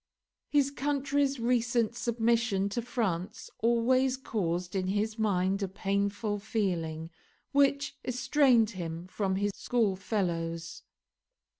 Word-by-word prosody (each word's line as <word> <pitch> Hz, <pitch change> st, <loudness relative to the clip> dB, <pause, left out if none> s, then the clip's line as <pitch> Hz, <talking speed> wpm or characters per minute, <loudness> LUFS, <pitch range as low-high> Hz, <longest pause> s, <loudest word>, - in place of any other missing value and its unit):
His 280 Hz, -2 st, +3 dB
country's 280 Hz, -1 st, 0 dB
recent 235 Hz, -1 st, +1 dB
submission 230 Hz, -4 st, +1 dB
to 235 Hz, +4 st, -2 dB
France 210 Hz, -7 st, -3 dB
always 250 Hz, +3 st, +3 dB
caused 180 Hz, -8 st, -2 dB
in 185 Hz, -1 st, 0 dB
his 215 Hz, +3 st, -1 dB
mind 195 Hz, -2 st, +1 dB
a 195 Hz, -, 0 dB
painful 200 Hz, +2 st, -1 dB
feeling, 170 Hz, -7 st, -2 dB, 0.4 s
which 280 Hz, 0 st, +2 dB
estranged 250 Hz, -3 st, +3 dB
him 170 Hz, -2 st, -5 dB
from 190 Hz, 0 st, -1 dB
his 205 Hz, +1 st, 0 dB
schoolfellows. 185 Hz, -8 st, -1 dB
215 Hz, 105 wpm, -30 LUFS, 190-245 Hz, 0.4 s, His